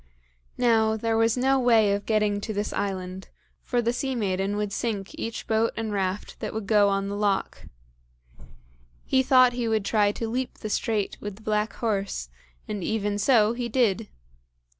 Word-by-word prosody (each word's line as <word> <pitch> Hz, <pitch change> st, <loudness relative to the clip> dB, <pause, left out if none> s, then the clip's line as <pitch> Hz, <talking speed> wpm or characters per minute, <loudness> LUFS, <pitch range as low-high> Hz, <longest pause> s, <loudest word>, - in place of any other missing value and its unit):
Now, 220 Hz, -2 st, +3 dB
there 225 Hz, +1 st, 0 dB
was 225 Hz, +1 st, +2 dB
no 265 Hz, +2 st, +3 dB
way 225 Hz, -5 st, +4 dB
of 200 Hz, 0 st, -3 dB
getting 210 Hz, -2 st, +1 dB
to 220 Hz, -, -4 dB
this 205 Hz, +1 st, -2 dB
island, 190 Hz, -1 st, -4 dB, 0.3 s
for 245 Hz, -1 st, -1 dB
the 235 Hz, +1 st, +1 dB
sea 265 Hz, +1 st, -2 dB
maiden 195 Hz, -2 st, -1 dB
would 210 Hz, -1 st, -2 dB
sink 205 Hz, -5 st, -3 dB
each 230 Hz, -, -5 dB
boat 225 Hz, +1 st, +1 dB
and 220 Hz, -2 st, -3 dB
raft 195 Hz, 0 st, -3 dB
that -, -, -5 dB
would 220 Hz, -2 st, -3 dB
go 205 Hz, -1 st, +4 dB
on 195 Hz, 0 st, 0 dB
the 200 Hz, -, -3 dB
loch. 205 Hz, -1 st, -1 dB, 1.4 s
He 260 Hz, -, +3 dB
thought 255 Hz, -1 st, +5 dB
he 240 Hz, -1 st, -2 dB
would 220 Hz, -2 st, 0 dB
try 205 Hz, -2 st, +3 dB
to 230 Hz, -, -4 dB
leap 250 Hz, +3 st, -3 dB
the 215 Hz, -, -6 dB
strait 215 Hz, -3 st, -1 dB
with 205 Hz, -1 st, -5 dB
the 220 Hz, -, -17 dB
black 215 Hz, 0 st, 0 dB
horse, 200 Hz, -, -2 dB, 0.4 s
and 205 Hz, -3 st, -4 dB
even 205 Hz, -1 st, -1 dB
so 220 Hz, -2 st, +4 dB
he 240 Hz, 0 st, -3 dB
did. 225 Hz, -, +1 dB
215 Hz, 180 wpm, -26 LUFS, 205-230 Hz, 1.4 s, thought